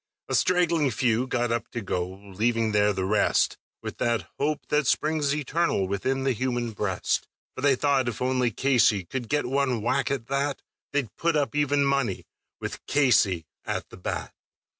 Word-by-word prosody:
A - - -4
straggling 170 -5 +3
few 120 +1 +1
got 120 -2 0
up 115 -1 -2
to 120 - -2
go, 90 -4 -2
leaving 110 +4 -1
there 105 0 +3
the 95 -2 -2
rest 105 +2 +2 0.2
With - - -6
that 120 -2 0
hope 150 +1 -1
that 150 -2 +2
springs 150 -2 +1
eternal 150 - 0
within 130 +8 -1
the 135 - +2
human 120 -1 -1
breast; 100 -4 -1 0.3
For - - -7
they 140 -1 +4
thought 135 -1 +2
if 115 - -6
only 125 -1 +1
Casey 115 -4 +3
could 120 +3 -5
get 145 0 +1
one 130 -3 0
whack, 135 +4 +1
at 135 -5 -2
that 140 +2 -1 0.3
They'd 140 -6 -2
put 170 -1 +1
up 145 -1 +1
even 145 -1 +2
money, 140 -8 0 0.3
with - - -6
Casey 115 - +3 0.2
at - - -4
the - - -12
bat. - - -4
130 Hz, 175 wpm, -26 LUFS, 110-140 Hz, 0.3 s, they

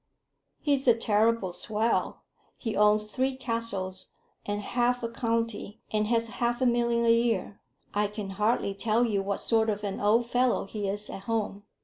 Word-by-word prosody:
"He's 280 -3 +1
a 240 - +7
terrible 220 -3 +2
swell. 220 +5 -1 0.3
He 225 -3 -3
owns 210 0 +4
three 260 +5 -1
castles, 230 -7 -3 0.4
and 205 0 -1
half 245 +3 0
a 230 - -1
county, 230 -2 -2
and 215 -1 +1
has 230 0 +2
half 240 0 +1
a 260 - +2
million 235 -1 +2
a 230 - +6
year. 230 -4 0 0.3
I 210 0 +2
can 205 -1 -6
hardly 210 0 +1
tell 225 +4 +1
you 205 -4 0
what 200 +1 -2
sort 225 -1 +3
of 210 0 -2
an 200 -1 -3
old 220 +4 +3
fellow 245 -1 +1
he 205 0 -4
is 205 +1 -2
at 195 - -8
home. 210 -3 -2
225 Hz, 170 wpm, -28 LUFS, 205-235 Hz, 0.4 s, a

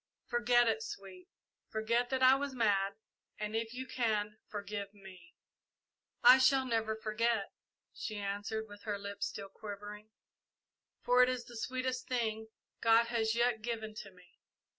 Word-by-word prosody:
Forget 240 0 +3
it, 220 -1 +1
Sweet, 195 -4 -9 0.4
forget 230 +3 0
that 260 -1 0
I 255 +1 +9
was 275 0 -1
mad, 200 -4 +2 0.4
and 210 +1 -4
if 225 0 -1
you 255 +2 -5
can, 215 -4 -1
forgive 205 -1 -5
me!" 185 -4 -14 0.9
"I 260 +1 +9 0.2
never 225 -3 0
shall 220 - -15
forget," 220 -1 0 0.4
she 215 -3 -5
answered, 205 +2 -3
with 205 -1 -12
her 205 -2 -3
lips 200 0 -4
still 195 -2 -7
quivering, 210 +1 -8 0.9
"for 250 +1 +5
it 250 - +6
is 255 -1 -2
the 240 - -12
sweetest 255 +2 -2
thing 220 -3 -1 0.3
God 230 +1 +5
has 225 -1 +1
yet 235 -1 +2
given 220 -1 -4
to 210 -1 -8
me. 180 -2 -21
220 Hz, 150 wpm, -33 LUFS, 205-240 Hz, 0.9 s, I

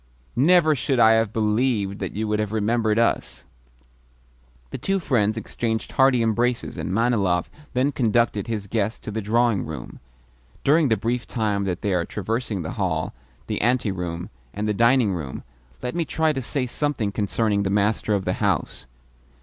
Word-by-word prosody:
"Never 155 +4 +5
should 135 -2 0
I 110 -1 +7
have 110 -2 +2
believed 105 -2 0
that 95 - -4
you 110 +1 -2
would 105 0 0
have 105 -1 -1
remembered 110 0 +1
us!" 115 - 0 1.3
The - - -5
two 195 0 0
friends 110 - +1
exchanged 110 0 -3
hearty 130 -3 +4
embraces, 120 +2 0
and - - -4
Manilov 100 -5 +1 0.2
then 130 +3 +2
conducted 115 -5 +1
his 110 -3 -3
guest 110 +1 -2
to - - -5
the 110 +1 -3
drawing 115 0 +2
room. 75 -6 -8 0.6
During 150 0 +4
the 110 - +3
brief 115 +4 -2
time 105 -4 -1
that 90 -2 -3
they 100 -2 +1
are 90 -2 +1
traversing 105 0 -3
the 80 - -4
hall, - - -1 0.3
the - - -2
anteroom, 95 -8 -1 0.2
and 105 +1 -2
the 105 - +1
dining 115 -1 +3
room, 75 -7 -5 0.4
let 125 - -2
me 170 0 0
try 160 -1 +1
to 135 - -3
say 130 +1 -2
something 125 -5 -1
concerning 100 +1 0
the 100 - -1
master 105 +1 +1
of 95 - -2
the - - +1
house. - - -1
110 Hz, 170 wpm, -23 LUFS, 100-125 Hz, 1.3 s, I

